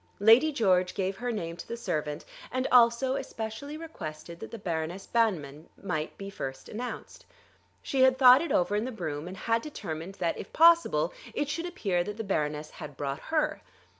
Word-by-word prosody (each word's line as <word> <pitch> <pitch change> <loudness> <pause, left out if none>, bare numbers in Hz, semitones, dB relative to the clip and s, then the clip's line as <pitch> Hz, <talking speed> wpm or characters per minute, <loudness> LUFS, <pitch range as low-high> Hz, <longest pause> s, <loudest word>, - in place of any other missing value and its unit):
Lady 230 +9 +6
George 185 -9 +2
gave 190 0 -1
her 245 +1 -2
name 170 -7 -4
to - - -10
the 235 - -5
servant, 150 -9 -3 0.3
and 255 0 -1
also 245 +2 +5
especially 270 +2 -5
requested 170 - -8
that - - -7
the 230 - -7
Baroness 170 0 -3
Banmann 160 -11 0
might 160 -6 -3
be 195 0 -7
first 135 -7 -6
announced. 240 +3 -7 0.6
She 270 - 0
had 260 0 +5
thought 255 0 +8
it 335 -4 -3
over 180 +3 +2
in 210 +2 0
the 260 - -4
brougham, 155 -8 -4
and 185 +1 -7
had 230 +4 +1
determined 190 - -6
that 175 -4 -1
if - - -8
possible 335 +9 +5 0.2
it 290 - -1
should 335 +3 -2
appear 195 - -1
that 210 +3 -6
the 225 - -3
Baroness 150 -6 -2
had 150 -3 -9
brought 140 0 -3
her. 315 -1 0
205 Hz, 185 wpm, -29 LUFS, 165-255 Hz, 0.6 s, thought